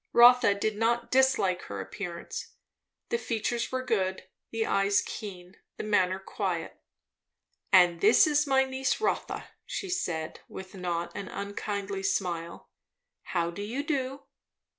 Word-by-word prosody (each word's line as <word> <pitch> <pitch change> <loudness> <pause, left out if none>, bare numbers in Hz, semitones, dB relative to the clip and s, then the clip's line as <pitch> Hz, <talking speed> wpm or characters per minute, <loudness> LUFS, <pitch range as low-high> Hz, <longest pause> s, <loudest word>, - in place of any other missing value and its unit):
Rotha 240 -3 +7
did 210 +1 -1
not 235 +2 +1
dislike 255 -9 +3
her 100 0 -6
appearance. 170 - -6 0.6
The 470 - 0
features 235 - -2
were 260 0 -1
good, 190 -6 0 0.3
the 225 -1 -1
eyes 200 0 +3
keen, 185 -3 -7 0.2
the - - -4
manner 190 -3 +2
quiet 190 - -4 0.9
"And 175 -3 +6
this 215 +3 +7
is 295 -1 +2
my 265 -1 +4
niece 265 0 -1
Rotha," 440 - -2
she 390 - -5
said 160 - -2
with 190 0 -9
a 195 - -9
not 175 -1 -2
unkindly 200 0 -4
smile. 175 -3 -2 0.5
"How 170 -1 -1
do 200 - -7
you 235 +8 -3
do?" 275 -2 -2
205 Hz, 135 wpm, -29 LUFS, 185-250 Hz, 0.9 s, Rotha